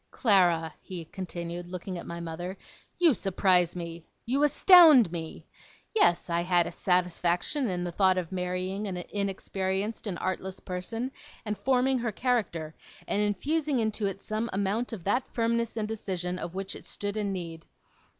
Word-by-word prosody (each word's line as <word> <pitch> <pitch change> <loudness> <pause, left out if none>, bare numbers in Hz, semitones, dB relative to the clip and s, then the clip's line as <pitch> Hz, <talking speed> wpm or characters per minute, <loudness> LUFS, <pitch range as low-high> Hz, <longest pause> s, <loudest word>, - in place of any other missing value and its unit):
'Clara,' 175 -8 +3
he 175 -3 -7
continued, 175 -1 -6
looking 180 +1 -6
at - - -9
my 170 0 -5
mother, 175 +3 -5 0.4
'you 340 -5 +5
surprise 185 -4 +2
me! 170 -1 -6 0.2
You 265 +4 0
astound 295 - +7
me! 165 -2 -6 0.5
Yes, 175 - +3
I 170 -1 0
had 175 -1 +3
a - - -4
satisfaction 180 - 0
in 180 -1 -2
the 175 - -3
thought 185 +1 +3
of 180 -2 -3
marrying 185 +2 -2
an 185 -2 -4
inexperienced 195 +2 -3
and 185 -4 -3
artless 185 +1 -3
person, 225 +8 -4 0.3
and 210 -1 -1
forming 255 +4 +2
her 235 -2 -1
character, 205 -10 -1 0.3
and 205 - +1
infusing 280 +8 0
into 220 -2 0
it 195 0 -4
some 215 +3 -3
amount 200 +6 -1
of 210 -7 -6
that 245 +8 +1
firmness 230 -1 -1
and 215 -1 -1
decision 180 -5 -3
of 175 - -6
which 195 0 -3
it - - -11
stood 205 0 -4
in 210 -2 -1
need. 165 -3 -6
190 Hz, 160 wpm, -28 LUFS, 175-225 Hz, 0.5 s, astound